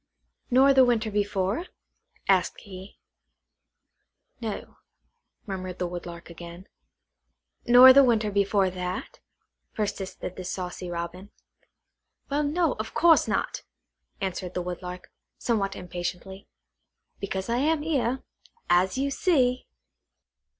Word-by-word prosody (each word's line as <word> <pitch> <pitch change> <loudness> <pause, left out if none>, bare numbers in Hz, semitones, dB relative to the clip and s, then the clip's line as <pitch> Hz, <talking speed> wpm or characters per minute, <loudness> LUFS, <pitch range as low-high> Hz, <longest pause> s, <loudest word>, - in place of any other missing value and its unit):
"Nor 270 +2 +6
the 265 -1 +7
winter 230 -3 +1
before?" 205 - -1 0.6
asked 190 -2 +2
he. 190 0 -11 1.4
"No," 220 -3 -6 0.7
murmured 185 -2 -5
the 180 - -1
Woodlark 175 -1 -8
again. 170 +2 -11 1.0
"Nor 250 +2 +10
the 275 +1 +8
winter 225 -4 +2
before 200 -1 +2
that?" 180 0 -5 0.6
persisted 195 -3 -4
the 185 - -5
saucy 180 0 -5
Robin. 175 +3 -5 1.0
"Well, 290 +1 +1
no; 310 +2 +1
of 220 +1 -5
course 335 -1 +5
not," - - -1 0.6
answered 185 -1 -4
the 180 - -1
Woodlark, 180 0 -7 0.3
somewhat 200 -5 -1
impatiently, 180 +2 -6 0.7
"because 190 -1 -3
I 235 +1 0
am 300 +3 +1
here, 265 -5 0 0.5
as 185 +5 +3
you 275 +1 0
see." 255 -6 +1
200 Hz, 110 wpm, -26 LUFS, 180-250 Hz, 1.4 s, Nor